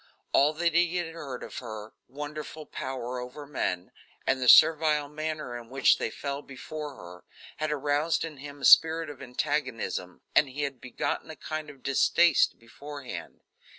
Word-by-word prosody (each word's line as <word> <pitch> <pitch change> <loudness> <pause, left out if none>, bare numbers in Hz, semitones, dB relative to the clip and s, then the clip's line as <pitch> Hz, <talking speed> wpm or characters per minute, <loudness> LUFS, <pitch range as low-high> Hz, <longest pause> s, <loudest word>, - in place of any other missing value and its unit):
All 145 +3 +4
that 170 +1 +1
he 175 +1 +3
had 170 -2 -3
heard 140 -6 -7
of - - -6
her 110 -3 -8
wonderful 150 +3 -7
power 125 -2 -5
over 125 +4 -8
men, 90 -11 -2 0.3
and 130 0 +1
the 125 - +4
servile 155 -2 +6
manner 150 -3 -4
in 120 -1 -8
which 135 +1 +4
they - - -1
fell 140 +4 -4
before 145 +1 -7
her, 90 -3 -12 0.3
had 155 0 -1
aroused 150 +3 +1
in 155 -3 -8
him 145 +1 -10
a - - -1
spirit 160 -1 +6
of 140 - -13
antagonism, 125 -8 -2
and 145 - +5
had 140 -4 -3
begotten 130 +4 -3
a 160 - -7
kind 155 -1 -5
of 140 -3 -14
distaste 170 +5 +4
beforehand. 140 +3 -9
145 Hz, 160 wpm, -28 LUFS, 130-155 Hz, 0.3 s, servile